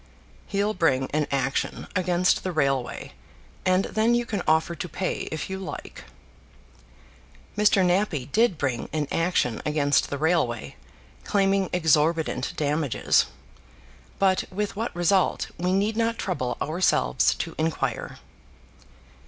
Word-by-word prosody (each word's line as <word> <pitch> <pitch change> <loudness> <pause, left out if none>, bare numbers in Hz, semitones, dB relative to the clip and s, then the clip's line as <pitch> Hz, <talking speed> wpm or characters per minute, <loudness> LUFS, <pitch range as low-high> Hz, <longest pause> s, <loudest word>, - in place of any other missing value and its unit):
"He'll 205 +2 0
bring 135 -8 +1
an 150 0 0
action 135 0 -1
against 180 -1 +2
the 185 - -2
railway, 135 - -1 0.5
and 185 +1 +3
then 225 +2 +2
you 240 0 0
can 205 -5 -3
offer 160 +2 +2
to 170 +2 -6
pay 185 +4 -3
if 160 - -4
you 190 0 -5
like." 190 - -8 1.5
Mr. 205 -2 +4
Nappie 175 -7 0
did 220 -5 +3
bring 130 -5 -2
an 150 -2 -1
action 165 -9 0
against 145 -2 +1
the 140 - -3
railway, 150 - 0 0.5
claiming 195 - +1
exorbitant 160 -1 +1
damages; 150 -2 +1 0.9
but 190 -1 +2
with 205 +2 -3
what 225 0 -3
result, 175 +2 +1
we 180 +1 0
need 205 +3 +1
not 230 0 0
trouble 130 -10 -2
ourselves 155 - +2
to - - -4
inquire. 160 0 -2
175 Hz, 125 wpm, -25 LUFS, 150-195 Hz, 1.5 s, Mr